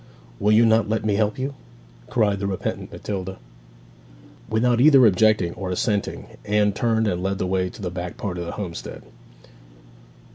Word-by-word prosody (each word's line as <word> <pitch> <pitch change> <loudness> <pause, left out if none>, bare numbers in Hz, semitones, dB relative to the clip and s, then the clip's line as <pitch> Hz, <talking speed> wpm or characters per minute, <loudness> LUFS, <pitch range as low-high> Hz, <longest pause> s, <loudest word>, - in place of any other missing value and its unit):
'Will 105 - +2
you 110 +2 +6
not 110 -1 +3
let 110 0 -1
me 105 - +2
help 105 +1 0
you?' 135 +2 -3 0.6
cried 105 -4 +1
the 100 - -2
repentant 95 -2 -4
Matilda. 95 -2 -5 1.1
Without 120 +2 +2
either 135 -3 +7
objecting 105 -3 +3
or 95 -2 -5
assenting 100 +2 -1 0.2
Anne 105 -1 +2
turned 110 +1 +1
and 90 -3 -1
led 95 +1 -1
the 95 - -2
way 90 0 0
to 100 - -11
the 90 - -3
back 90 0 -6
part 90 -4 -4
of 85 - -4
the - - -5
homestead. 90 -5 -7
105 Hz, 170 wpm, -23 LUFS, 95-110 Hz, 1.1 s, either